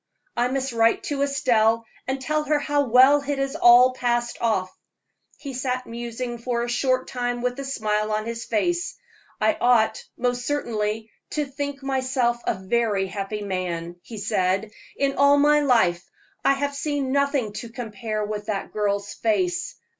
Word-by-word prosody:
I 240 +1 +2
must 265 0 -2
write 230 0 +3
to 285 -1 -2
Estelle 230 -5 +2 0.2
and 265 +1 -1
tell 305 +3 -1
her 300 0 +2
how 290 -1 +1
well 260 +5 +6
it 285 0 -2
has 275 0 -2
all 245 +2 +7
passed 240 -1 -1
off." 200 -6 0 0.6
He 280 -2 -7
sat 255 0 -2
musing 240 +1 -5
for 235 0 -1
a - - -3
short 255 +1 +1
time 245 -1 -3
with 250 +2 -1
a - - -3
smile 215 -5 -1
on 215 0 -1
his 230 0 -4
face. 350 - -1 0.4
"I 320 - +3
ought, 230 -3 +3
most 245 0 -1
certainly, 220 -6 -2 0.2
to 300 -1 0
think 280 0 -5
myself 260 -3 0
a - - +2
very 200 +1 0
happy 200 +2 -4
man," 175 -3 -3
he 225 - -10
said. 195 0 0 0.3
"In 275 -1 0
all 280 0 +6
my 295 +1 +5
life 225 -11 +3 0.4
I - - +5
have 285 +1 -2
seen 285 -2 -2
nothing 280 -6 +1
to 235 - -9
compare 215 -2 -4
with 210 0 -5
that 205 -3 -3
girl's 205 -1 -1
face. 350 - 0
240 Hz, 165 wpm, -24 LUFS, 215-275 Hz, 0.6 s, all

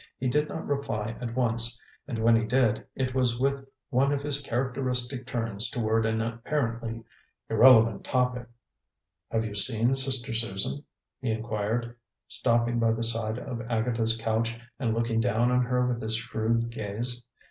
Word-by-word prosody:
He 130 - -2
did 150 +4 +1
not 160 - -5
reply 115 -6 -3
at 120 -1 -5
once, 115 -1 0 0.3
and 125 -5 -4
when 115 +1 +4
he 115 - +2
did, 115 -1 +1
it 130 -1 -2
was 125 -2 +1
with 140 +1 0 0.3
one 135 +2 +2
of 140 -1 -1
his 145 -1 +2
characteristic 125 0 -2
turns 115 -3 -1
toward 110 -1 0
an 110 0 0
apparently 115 -1 -3 0.5
irrelevant 115 -2 +6
topic. 125 -2 -1 0.8
"Have 115 0 -1
you 105 - -5
seen 115 +4 +7
Sister 130 -3 +2
Susan?" 115 +4 -3 0.4
he 130 - -2
inquired, 110 +1 -2 0.3
stopping 120 0 +1
by 115 -1 +2
the 115 +1 -3
side 115 -1 +2
of 125 -2 -6
Agatha's 115 -1 0
couch 115 +1 -1 0.2
and 115 -4 0
looking 115 0 0
down 120 0 +1
on 125 0 +3
her 125 +1 +1
with 125 -1 -2
his 110 0 0
shrewd 115 +1 -1
gaze. 115 +3 -3
115 Hz, 160 wpm, -27 LUFS, 115-125 Hz, 0.8 s, seen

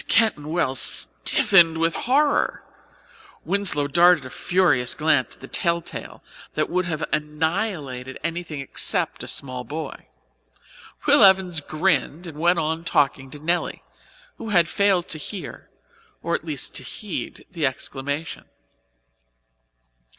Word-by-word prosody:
Mrs. - - -16
Keyton 220 -10 +2
Wells 155 -6 0
stiffened 165 - +4
with 165 0 +1
horror. 285 +4 +1 0.8
Winslow 195 -8 +3
darted 170 +1 +4
a 130 - -9
furious 130 -9 +1
glance 150 -5 +1
at - - -26
the 135 - -9
tell 170 +2 +1
tale 170 - -9 0.3
that - - -1
would 180 +1 0
have 160 -2 -3
annihilated 150 - -2
anything 165 -3 -4
except 135 - 0
a - - -7
small 130 -2 -2
boy. 150 +1 -7 1.0
Will - - +6
Evans 190 -4 +4
grinned 155 +1 0
and 155 -3 -9
went 175 +2 +3
on 160 +1 -1
talking 135 -4 +1
to 145 - -10
Nelly, 170 +4 -2 0.6
who 225 - -6
had 175 -5 +4
failed 195 -2 +1
to 155 - -4
hear, 185 +5 -8 0.5
or 170 - -2
at 170 - -2
least 150 -5 -1
to - - -5
heed, 200 +8 -6
the 165 -5 0
exclamation. 140 +3 -5
160 Hz, 135 wpm, -23 LUFS, 145-175 Hz, 1.0 s, Will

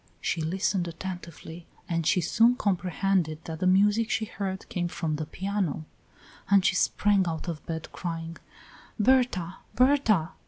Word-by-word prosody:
She 170 - -1
listened 180 +2 0
attentively, 170 -1 -8 0.2
and 165 -4 -1
she 180 - +3
soon 230 +8 +4
comprehended 185 -5 0
that 160 -1 -6
the 185 - +1
music 205 +4 +4
she 220 - 0
heard 195 -3 -5
came 175 -2 -2
from 165 -3 -2
the 155 -1 -4
piano; 190 -4 -2 0.6
and 195 -2 +5
she 190 - +4
sprang 195 0 +2
out 160 +1 -4
of 165 -3 -4
bed, 160 -1 -5
crying: 165 -1 -5 0.6
"Berta! 210 -7 +2 0.2
Berta!" 240 - +3
185 Hz, 145 wpm, -27 LUFS, 165-200 Hz, 0.6 s, and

